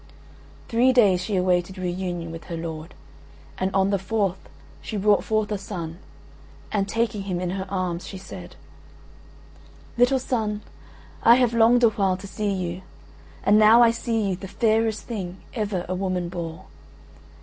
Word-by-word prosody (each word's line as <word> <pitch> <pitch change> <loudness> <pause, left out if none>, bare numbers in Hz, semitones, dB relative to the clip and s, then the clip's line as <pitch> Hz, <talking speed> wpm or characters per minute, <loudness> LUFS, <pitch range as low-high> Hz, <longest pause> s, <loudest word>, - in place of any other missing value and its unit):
Three 240 +3 +4
days 205 -8 +4
she 195 +2 -2
awaited 180 0 +1
re 180 -1 -2
union 175 -2 -4
with 165 0 -9
her 170 - -5
lord, 165 0 -6 0.6
and 190 - +1
on 195 +1 +3
the 200 - +1
fourth 195 -1 -2 0.3
she 215 - -5
brought 205 +1 +3
forth 215 -1 0
a 205 - -1
son; 175 -4 -6 0.7
and 200 -1 0
taking 225 -2 0
him 185 -3 -3
in 180 -1 -2
her 190 0 -4
arms 185 -3 -2
she 195 - -7
said: 190 0 -10 1.4
"Little 245 +2 +5
son, 220 -5 -2 0.6
I 235 - +7
have 245 -2 +2
longed 235 +2 +5
a 230 - +7
while 195 -3 0
to 195 - -10
see 205 +1 -3
you, 180 -1 -3 0.6
and 210 +1 +5
now 220 +3 +7
I 230 - +6
see 230 0 -2
you 185 - 0
the 195 +2 -8
fairest 220 +1 +1
thing 190 -6 -5 0.2
ever 205 -6 -2
a 185 - -2
woman 185 -2 -2
bore. 170 0 -6
195 Hz, 165 wpm, -24 LUFS, 180-220 Hz, 1.4 s, I